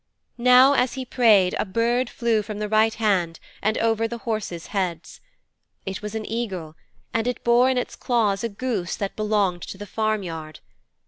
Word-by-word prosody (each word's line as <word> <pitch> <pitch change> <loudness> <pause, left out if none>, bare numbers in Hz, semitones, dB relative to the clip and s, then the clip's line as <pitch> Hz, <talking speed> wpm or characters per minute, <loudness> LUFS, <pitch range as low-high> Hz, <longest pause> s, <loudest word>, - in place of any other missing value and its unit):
Now 250 +3 +7
as 255 -3 +1
he 260 -1 -4
prayed 215 -8 +4
a - - +2
bird 235 +5 0
flew 230 -2 0
from 210 0 -7
the 210 0 -2
right 220 +1 +3
hand 185 -7 0 0.2
and 215 +2 0
over 225 0 +1
the 235 +1 -5
horses' 215 -8 -4
heads. 180 -5 -3 0.6
It 190 0 -5
was 210 +1 -6
an 220 -1 -3
eagle, 190 -9 -4 0.4
and 230 +1 0
it 250 - -3
bore 240 +2 +4
in 260 - +1
its 250 - -3
claws 215 -5 0
a 230 - -1
goose 205 -5 -3
that 200 -1 -4
belonged 205 -4 0
to - - -7
the 205 - -7
farmyard. 185 -8 -3
215 Hz, 180 wpm, -23 LUFS, 195-235 Hz, 0.6 s, Now